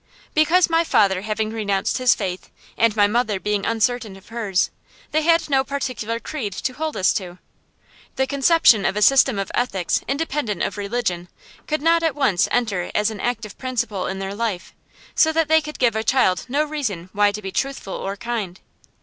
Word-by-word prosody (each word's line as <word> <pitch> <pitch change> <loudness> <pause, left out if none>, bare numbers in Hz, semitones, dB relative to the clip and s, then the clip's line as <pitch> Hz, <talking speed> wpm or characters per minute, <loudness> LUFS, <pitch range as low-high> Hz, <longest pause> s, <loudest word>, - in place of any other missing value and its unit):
Because 330 +4 +4
my 330 0 +2
father 195 - +2
having 215 +1 -2
renounced 205 0 -1
his 250 -3 +4
faith, 185 -3 -5 0.3
and 230 -2 +2
my 205 -1 +5
mother 215 -2 0
being 210 0 -1
uncertain 230 -2 0
of 195 - -16
hers, 215 -5 0 0.4
they 310 - +2
had 330 +1 +3
no 270 -2 +2
particular 255 -5 -3
creed 235 -8 -5
to 255 +7 -3
hold 310 +3 -4
us 185 - +3
to. 180 -3 -5 0.8
The 265 - +1
conception 275 - +4
of 195 - 0
a 210 - +2
system 270 -3 +5
of 195 -1 -3
ethics 195 -8 0
independent 275 - -2
of - - -2
religion 200 -4 -2 0.4
could 305 -1 -2
not 335 +1 +4
at 325 -4 0
once 260 -12 +2
enter 210 -7 -1
as 210 +1 +2
an 215 - -8
active 225 -3 -3
principle 235 -7 -2
in 190 - -4
their 195 0 -4
life; 205 -4 -3 0.4
so 320 - +4
that 325 -1 +2
they 320 0 +5
could 300 0 -8
give 235 -3 +2
a 220 - -1
child 225 -7 +2
no 285 +4 +1
reason 240 - -4
why 205 0 +3
to 205 - -6
be 190 - -5
truthful 270 -4 -3
or 195 +1 -4
kind. 205 -4 -4
225 Hz, 190 wpm, -22 LUFS, 200-275 Hz, 0.8 s, my